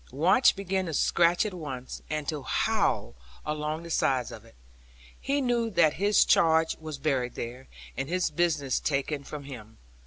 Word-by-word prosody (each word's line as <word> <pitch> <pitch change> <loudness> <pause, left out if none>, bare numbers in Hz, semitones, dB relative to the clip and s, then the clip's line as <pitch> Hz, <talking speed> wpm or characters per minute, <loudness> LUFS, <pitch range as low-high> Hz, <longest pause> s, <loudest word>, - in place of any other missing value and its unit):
Watch 170 - +4
began 190 -1 -2
to 160 - -3
scratch 175 +6 +3
at 210 - -3
once, 135 -7 -7
and 155 -1 -3
to 150 -3 -2
howl 130 - 0 0.3
along 150 +1 -3
the 170 - -8
sides 130 -5 +1
of 110 - -10
it; 115 - -19 0.6
he 280 +1 -1
knew 240 -3 0
that 170 -6 +3
his 205 0 +4
charge 160 -1 +3
was 155 -2 -7
buried 135 -4 -1
there, 125 +3 -7 0.3
and 135 +2 -4
his 180 -1 0
business 150 -5 0
taken 140 0 -2
from 145 +1 -8
him. 115 -6 -10
155 Hz, 165 wpm, -28 LUFS, 135-175 Hz, 0.6 s, Watch